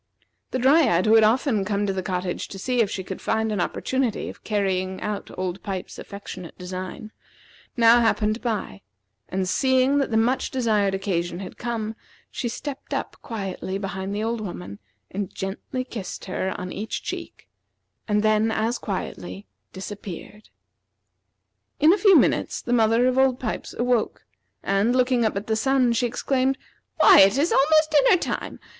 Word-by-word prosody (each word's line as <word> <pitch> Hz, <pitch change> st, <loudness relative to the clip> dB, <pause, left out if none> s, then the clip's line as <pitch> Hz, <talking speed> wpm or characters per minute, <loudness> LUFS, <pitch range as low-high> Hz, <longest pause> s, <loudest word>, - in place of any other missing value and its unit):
The -, -, -2 dB
Dryad, 260 Hz, -, +4 dB
who 215 Hz, -, +4 dB
had 225 Hz, -1 st, +7 dB
often 225 Hz, -1 st, +2 dB
come 205 Hz, +1 st, -1 dB
to 195 Hz, -, -1 dB
the 190 Hz, -, -2 dB
cottage 180 Hz, -1 st, -3 dB
to 195 Hz, -, -9 dB
see 250 Hz, +5 st, 0 dB
if 210 Hz, -, +1 dB
she 190 Hz, -, -4 dB
could 190 Hz, 0 st, -7 dB
find 220 Hz, 0 st, 0 dB
an 205 Hz, -4 st, 0 dB
opportunity 260 Hz, +5 st, -1 dB
of -, -, -12 dB
carrying 190 Hz, -3 st, -1 dB
out 210 Hz, -1 st, -4 dB
old 185 Hz, 0 st, -3 dB
Pipes's 190 Hz, -2 st, -5 dB
affectionate 190 Hz, -3 st, -9 dB
design, 185 Hz, +5 st, -6 dB, 0.7 s
now 230 Hz, 0 st, +7 dB
happened 220 Hz, -1 st, +1 dB
by; 215 Hz, -, -3 dB, 0.5 s
and 185 Hz, 0 st, -1 dB
seeing 260 Hz, +5 st, +3 dB
that 275 Hz, -, 0 dB
the 220 Hz, -, +1 dB
much 240 Hz, +4 st, +1 dB
desired 215 Hz, -6 st, +1 dB
occasion 175 Hz, -3 st, -2 dB
had 190 Hz, 0 st, -8 dB
come, 225 Hz, -2 st, -3 dB, 0.4 s
she 240 Hz, -, -3 dB
stepped 275 Hz, +3 st, -5 dB
up -, -, -4 dB
quietly 195 Hz, -3 st, -4 dB
behind 195 Hz, 0 st, -4 dB
the 210 Hz, -, -2 dB
old 230 Hz, 0 st, -2 dB
woman 100 Hz, -, -7 dB, 0.3 s
and 195 Hz, -1 st, -3 dB
gently 195 Hz, +6 st, -4 dB
kissed 220 Hz, -6 st, -7 dB
her 190 Hz, 0 st, -3 dB
on 180 Hz, 0 st, -5 dB
each 215 Hz, +2 st, -4 dB
cheek, -, -, -7 dB, 0.6 s
and 210 Hz, -1 st, +1 dB
then 215 Hz, +1 st, +3 dB
as 225 Hz, +2 st, -1 dB
quietly 95 Hz, -, -5 dB, 0.3 s
disappeared. 200 Hz, +2 st, -8 dB, 1.3 s
In 310 Hz, +4 st, +6 dB
a -, -, +2 dB
few 395 Hz, -4 st, +7 dB
minutes -, -, +2 dB
the 245 Hz, -, -2 dB
mother 230 Hz, +1 st, +4 dB
of 255 Hz, +1 st, +2 dB
old 265 Hz, -2 st, +3 dB
Pipes 225 Hz, -, -4 dB
awoke, 240 Hz, -2 st, 0 dB, 0.4 s
and 200 Hz, +5 st, +2 dB
looking 250 Hz, -1 st, +3 dB
up 215 Hz, -, 0 dB
at 200 Hz, -, -4 dB
the 220 Hz, -, 0 dB
sun, 255 Hz, +1 st, +2 dB
she 240 Hz, +1 st, +1 dB
exclaimed: 260 Hz, +2 st, 0 dB, 0.4 s
"Why, -, -, +8 dB
it 195 Hz, +4 st, +6 dB
is 305 Hz, +5 st, +2 dB
almost 310 Hz, +3 st, +4 dB
dinner 300 Hz, +5 st, +5 dB
time! -, -, -4 dB
215 Hz, 165 wpm, -24 LUFS, 190-250 Hz, 1.3 s, Why